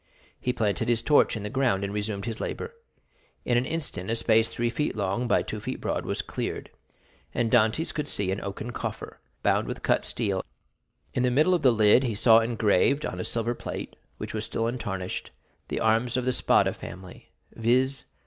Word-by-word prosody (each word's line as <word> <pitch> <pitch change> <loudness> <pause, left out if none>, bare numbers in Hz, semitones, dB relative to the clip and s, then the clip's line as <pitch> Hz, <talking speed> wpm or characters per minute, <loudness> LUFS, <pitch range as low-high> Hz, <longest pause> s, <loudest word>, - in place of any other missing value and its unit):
He 125 - 0
planted 105 -5 0
his 115 -1 +2
torch 145 -6 +4
in 105 - -6
the 105 - -3
ground 125 -7 +1
and 100 0 -3
resumed 105 -1 -3
his 115 -2 -4
labor. 460 - -4 0.7
In 120 - +2
an 120 +2 +2
instant 145 - -3
a 115 - +1
space 115 0 +3
three 120 0 -1
feet 150 +5 -1
long 100 +4 -1
by - - +3
two 110 - -5
feet - - -5
broad - - -2
was - - -1
cleared, - - -4 0.6
and 115 -2 +1
Dantès 120 +7 +3
could 150 -1 -3
see 100 -7 -1
an 95 - -2
oaken 100 +4 -5
coffer, - - -6 0.2
bound - - +2
with - - -5
cut - - +2
steel; 100 -5 -1 0.7
in 125 - 0
the 125 - +3
middle 150 +9 +4
of 175 - +2
the 135 - +6
lid 110 +1 +5
he 120 -5 -1
saw 115 +2 +6
engraved 115 +4 +2
on 90 - -4
a - - -2
silver 115 +1 -1
plate, - - -6 0.2
which - - -6
was 110 -1 -2
still 115 0 -2
untarnished, 105 -6 -3 0.4
the - - -2
arms 115 +3 +2
of 125 - -1
the 130 - +2
Spada - - +3
family—viz. 115 +8 -2
115 Hz, 195 wpm, -27 LUFS, 105-125 Hz, 0.7 s, the